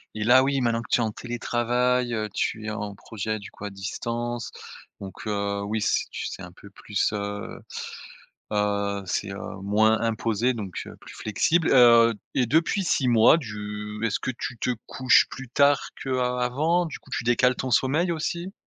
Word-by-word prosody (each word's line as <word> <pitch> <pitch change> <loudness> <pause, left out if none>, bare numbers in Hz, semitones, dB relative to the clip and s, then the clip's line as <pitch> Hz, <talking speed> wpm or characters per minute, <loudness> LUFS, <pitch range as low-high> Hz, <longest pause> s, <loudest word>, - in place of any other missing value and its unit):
et 105 - -2
là, 130 +3 +6
oui, 135 -1 +1
maintenant 115 -1 +1
que - - -11
tu - - +4
es - - +2
en 110 - -1
télétravail, 120 +1 0
heu, 110 -1 -2
tu 110 -1 -2
es - - -2
en 105 -1 -4
projet 110 +1 -4
du 100 - -10
coup, 105 - -9
à 100 - -5
distance, 115 +4 -4 0.5
donc, 95 +2 -9
heu, 100 -1 -1
oui, 110 +1 -2
c'est - - +1
tu - - -4
c'est 95 - -7
un 90 - -9
peu 100 +2 -15
plus, 100 +1 -1
heu, 100 0 -4 0.9
heu, 100 -1 0
c'est, 100 +2 -2
heu, 100 - -7
moins 110 +2 +3
imposé, 115 +1 0
donc, 100 -5 -5
heu, - - -10
plus - - -12
flexible, 160 - +1
heu 115 -2 +7 0.2
et 125 -2 +2
depuis 165 - +2
6 135 -6 +1
mois, 115 +6 +6
du 105 -3 -6
est-ce 105 - -1
que - - -2
tu 125 0 -5
te 125 - -1 0.2
couches 130 -1 +4
plus 135 -2 -8
tard 140 +2 +3
qu'av 130 -1 -1 0.2
avant? 155 +8 +1
Du 160 - -7
coup - - -20
tu - - -2
décales 125 +1 +3
ton 130 - -3
sommeil 155 +9 +2
aussi? 170 +4 -3
115 Hz, 190 wpm, -25 LUFS, 105-130 Hz, 0.9 s, heu